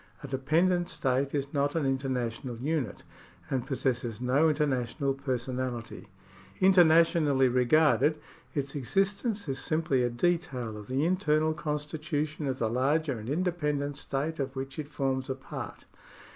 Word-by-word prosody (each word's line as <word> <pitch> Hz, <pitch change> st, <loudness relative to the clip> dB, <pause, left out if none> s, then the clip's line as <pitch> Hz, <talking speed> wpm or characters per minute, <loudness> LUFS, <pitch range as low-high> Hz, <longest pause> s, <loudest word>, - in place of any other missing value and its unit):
A -, -, -5 dB
dependent 170 Hz, +7 st, +1 dB
state 135 Hz, +1 st, 0 dB
is 140 Hz, 0 st, -2 dB
not 145 Hz, +1 st, +1 dB
an 160 Hz, -4 st, +1 dB
international 130 Hz, -3 st, -2 dB
unit, 135 Hz, -3 st, -2 dB, 0.5 s
and 130 Hz, -2 st, -1 dB
possesses 125 Hz, -4 st, -1 dB
no 135 Hz, +6 st, +3 dB
inter 150 Hz, 0 st, +2 dB
national 135 Hz, 0 st, -1 dB
personality. 125 Hz, -3 st, -4 dB, 0.5 s
Internationally 165 Hz, -6 st, +5 dB
regarded, 150 Hz, +5 st, +3 dB, 0.4 s
its 140 Hz, -1 st, -2 dB
existence 195 Hz, -, 0 dB
is 135 Hz, -1 st, -2 dB
simply 155 Hz, -4 st, +1 dB
a 120 Hz, -, +2 dB
detail 125 Hz, -5 st, -1 dB
of 105 Hz, -1 st, -9 dB
the 135 Hz, +4 st, 0 dB
internal 160 Hz, -4 st, +2 dB
constitution 150 Hz, 0 st, -3 dB
of 130 Hz, -1 st, -1 dB
the 115 Hz, -, 0 dB
larger 135 Hz, +3 st, +1 dB
and 110 Hz, +3 st, -7 dB
independent 150 Hz, -4 st, -1 dB
state 145 Hz, +4 st, -3 dB
of 135 Hz, 0 st, -3 dB
which 135 Hz, +2 st, -5 dB
it 150 Hz, -1 st, -5 dB
forms 135 Hz, -3 st, -1 dB
a 130 Hz, -, -1 dB
part. 135 Hz, -, -8 dB
140 Hz, 140 wpm, -29 LUFS, 130-155 Hz, 0.5 s, Internationally